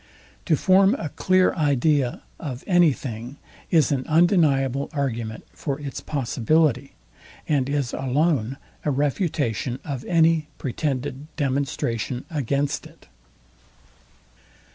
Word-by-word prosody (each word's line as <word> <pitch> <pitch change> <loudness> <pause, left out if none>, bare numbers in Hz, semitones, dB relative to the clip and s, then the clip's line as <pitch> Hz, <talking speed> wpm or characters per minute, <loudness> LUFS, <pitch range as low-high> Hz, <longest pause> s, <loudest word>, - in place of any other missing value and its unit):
To 160 - +3
form 190 - +4
a 160 - -4
clear 185 +5 +2
idea 145 -4 +1 0.2
of 130 -6 -6
any 175 -4 +5
thing, 125 +1 -6 0.3
is 155 -6 +3
an 135 -2 0
undeniable 150 -6 +3
argument 115 -6 -3
for 140 -2 -4
its 140 -2 -6
possibility, 140 0 +1 0.5
and 140 -3 +1
is 140 -3 -1
alone 135 -2 0 0.3
a - - 0
refutation 140 - -1
of 135 -4 -4
any 165 -2 +3
pretended 135 +1 -3
demonstration 130 -4 -2
against 140 -1 -1
it. - - -21
140 Hz, 105 wpm, -24 LUFS, 130-155 Hz, 0.5 s, any